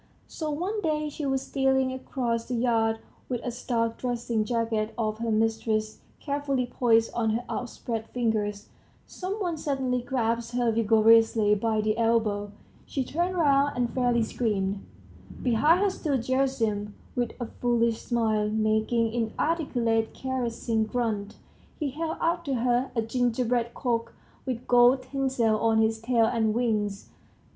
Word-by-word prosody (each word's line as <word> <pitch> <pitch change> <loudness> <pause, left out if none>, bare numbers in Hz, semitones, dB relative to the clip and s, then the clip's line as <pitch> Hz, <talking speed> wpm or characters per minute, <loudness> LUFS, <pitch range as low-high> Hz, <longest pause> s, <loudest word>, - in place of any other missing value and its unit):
So 310 -2 -5
one 365 +8 -2
day 305 -3 0
she 295 0 -4
was 270 0 0
stealing 265 -1 +1
across 240 -3 -2
the 245 - -3
yard, 225 -2 +2 0.3
with 245 -2 -1
a 245 - -2
starched 230 -1 -2
dressing 235 -3 -1
jacket 225 -2 -1
of 215 -1 -1
her 230 0 -2
mistress's 220 0 0 0.2
carefully 280 -3 -1
poised 230 -2 +2
on 225 -2 0
her 230 +3 -1
outspread 230 -2 -4
fingers... 215 -4 -1 0.4
some 370 +1 -5
one 355 -6 -2
suddenly 265 -4 -1
grasped 235 -2 -1
her 240 -2 +2
vigorously 225 -1 +4
by 215 +1 +1
the 215 0 +1
elbow; 220 -3 +1 0.4
she 270 - -2
turned 345 +7 -1
round 285 -4 +3
and 245 -1 0
fairly 245 -2 +2
screamed; 200 -4 -1 0.6
behind 295 - +4
her 405 -1 +3
stood 285 -8 -1
Gerasim. 235 -6 0 0.2
With 240 -2 -1
a 240 - -2
foolish 235 -1 0
smile, 220 -3 0
making 220 +1 +1
inarticulate 235 -2 0
caressing 235 -3 -1
grunts, 215 -3 -2 0.4
he 295 -4 -1
held 320 +3 -3
out 340 +1 0
to 275 -2 -1
her 245 +2 +1
a 230 - +1
gingerbread 240 0 0
cock 230 -3 -2 0.3
with 250 -2 -3
gold 245 +2 +5
tinsel 255 -5 0
on 225 0 +2
his 220 0 +2
tail 230 0 +2
and 225 -2 +1
wings. 210 -4 -1
235 Hz, 145 wpm, -27 LUFS, 225-260 Hz, 0.6 s, gold